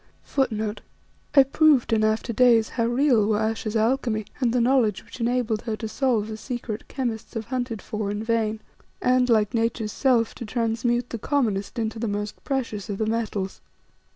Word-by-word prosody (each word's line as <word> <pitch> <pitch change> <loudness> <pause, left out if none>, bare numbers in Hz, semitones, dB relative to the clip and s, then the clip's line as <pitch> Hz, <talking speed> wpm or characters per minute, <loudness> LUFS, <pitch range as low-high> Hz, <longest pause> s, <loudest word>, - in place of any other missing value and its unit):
I 275 - +9
proved 275 -3 +3
in 215 -1 +3
after 220 +2 0
days 230 -1 +5
how 230 - -1
real 240 -3 +3
were 215 -1 +2
Ayesha's 220 0 -2
alchemy, 225 -1 +1
and 245 -4 +2
the 250 - +2
knowledge 235 -5 +2
which - - -12
enabled 235 -2 0
her 225 -2 -3
to 220 +1 -5
solve 230 -2 0
the 220 -1 -6
secret 230 -2 -5
that - - -23
chemists 240 -4 -4
have 225 -1 -3
hunted 245 -4 -2
for 210 -2 -3
in 205 +1 -3
vain, 220 -1 0 0.4
and, 250 0 +3
like 215 -3 +3
Nature's 225 -2 0
self, 245 -3 +2
to - - -8
transmute 235 +2 -1
the 230 - -4
commonest 220 -6 -1
into 225 -1 -2
the 230 - -1
most 205 0 -4
precious 230 -7 -3
of 200 - -3
the 220 - 0
metals. 215 -4 -2
230 Hz, 180 wpm, -25 LUFS, 215-245 Hz, 0.4 s, I